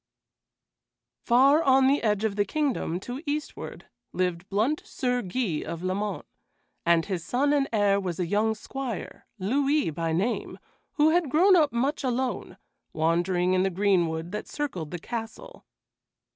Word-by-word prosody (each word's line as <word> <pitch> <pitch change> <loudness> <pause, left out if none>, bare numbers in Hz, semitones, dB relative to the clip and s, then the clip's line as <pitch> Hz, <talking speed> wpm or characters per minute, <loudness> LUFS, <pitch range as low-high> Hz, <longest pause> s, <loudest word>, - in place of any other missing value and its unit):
Far 270 +6 +5
on 265 -3 +4
the 275 +2 +3
edge 210 -2 +1
of 215 -3 0
the 205 - +2
kingdom 250 - -1
to 250 +6 -6
eastward 295 +1 -5 0.3
lived 180 0 -2
blunt 225 +10 +1
Sir 250 -1 -1
Guy 185 -5 -2
of 170 +1 -6
Lamont, 195 +2 -2 0.6
and 170 -1 +4
his 185 -5 -3
son 280 - +1
and 280 -2 +1
heir 205 -2 +3
was 180 -3 -4
a 180 - +1
young 215 +5 +1
squire, 250 0 -6
Louis 275 - +1
by 165 +1 -2
name, 195 +9 -1 0.4
who 305 +1 +4
had 340 -3 +2
grown 370 +8 +5
up 305 -5 +4
much 270 +6 -1
alone, 255 0 -2 0.4
wandering 175 +3 +1
in 185 - +3
the 190 - +2
greenwood 175 -4 +1
that 210 - -5
circled 190 - -4
the 175 - -5
castle. 230 - -7
215 Hz, 150 wpm, -26 LUFS, 180-270 Hz, 0.6 s, Far